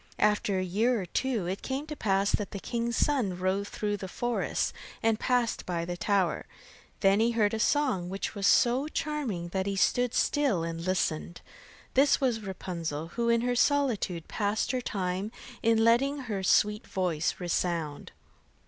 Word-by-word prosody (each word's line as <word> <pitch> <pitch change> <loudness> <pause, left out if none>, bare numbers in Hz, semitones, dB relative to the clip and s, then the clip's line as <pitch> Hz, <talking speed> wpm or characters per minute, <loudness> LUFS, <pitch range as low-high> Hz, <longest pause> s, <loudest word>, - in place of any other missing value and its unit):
After 210 -1 +2
a 185 - 0
year 220 +7 +1
or 190 - -4
two, 230 +2 -1
it 185 +3 -3
came 270 +2 -3
to 305 -1 -6
pass 195 -4 +1
that 210 - -1
the 200 - -6
king's 235 +2 -2
son 240 -11 +1
rode 190 +2 0
through 205 0 -2
the 190 - -6
forest 240 +5 -1 0.3
and 225 -1 +2
passed 245 -2 +1
by 170 -2 -2
the 175 0 -4
tower. 195 -1 0 0.5
Then 195 +1 +4
he 230 +1 +2
heard 215 -2 +2
a 220 - -1
song, 235 -9 +1
which 195 +1 -3
was 200 -2 0
so 250 +7 +4
charming 270 - -3
that 190 +2 -2
he 200 - -1
stood 245 +5 +2
still 275 - +2
and 165 0 -4
listened. 160 - -1 0.5
This 275 +2 +4
was 250 -5 +1
Rapunzel, 170 -5 -5
who 235 +5 -1
in 235 0 +3
her 245 +1 0
solitude 240 - +1
passed 210 +2 -1
her 255 -1 -1
time 190 -1 -2 0.3
in 225 -1 +3
letting 270 +5 +3
her 215 -6 -3
sweet 210 +3 +2
voice 180 -6 -1
resound. 170 -4 -2
205 Hz, 170 wpm, -29 LUFS, 185-240 Hz, 0.5 s, Then